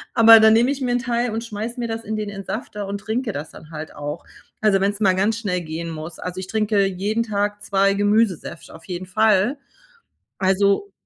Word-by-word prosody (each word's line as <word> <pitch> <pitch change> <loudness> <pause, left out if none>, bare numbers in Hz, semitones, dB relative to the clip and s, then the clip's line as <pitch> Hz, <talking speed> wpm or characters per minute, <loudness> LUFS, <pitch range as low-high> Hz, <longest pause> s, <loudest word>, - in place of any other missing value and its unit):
Aber 225 -1 +9
dann 220 0 +6
nehme 240 +4 +4
ich 280 -1 -4
mir 250 - 0
'n 245 - +2
Teil 240 0 -1
und 225 +1 -3
schmeiße 225 +2 -5
mir 235 - -2
das 225 0 -4
in 220 - -3
den 210 -1 -3
Entsafter 205 +1 -6
und 200 0 -4
trinke 220 +2 -2
das 150 +2 -6
dann 155 - -14
halt 155 0 -7
auch. 145 0 -6 0.4
Also, 200 -3 +3
wenn 200 - +2
es 205 - -11
mal 195 -3 +4
ganz 205 +4 +1
schnell 180 -5 -2
gehen 165 +1 -5
muss. 160 0 -7
Also, 180 0 -5
ich 185 - -6
trinke 210 -2 +1
jeden 200 +5 -1
Tag 205 -1 -2
2 195 0 +2
Gemüsesäfte 205 -4 0
auf - - -14
jeden 185 -1 -5
Fall. 215 +6 +2 0.8
Also 200 - +2
205 Hz, 210 wpm, -22 LUFS, 190-225 Hz, 0.8 s, Aber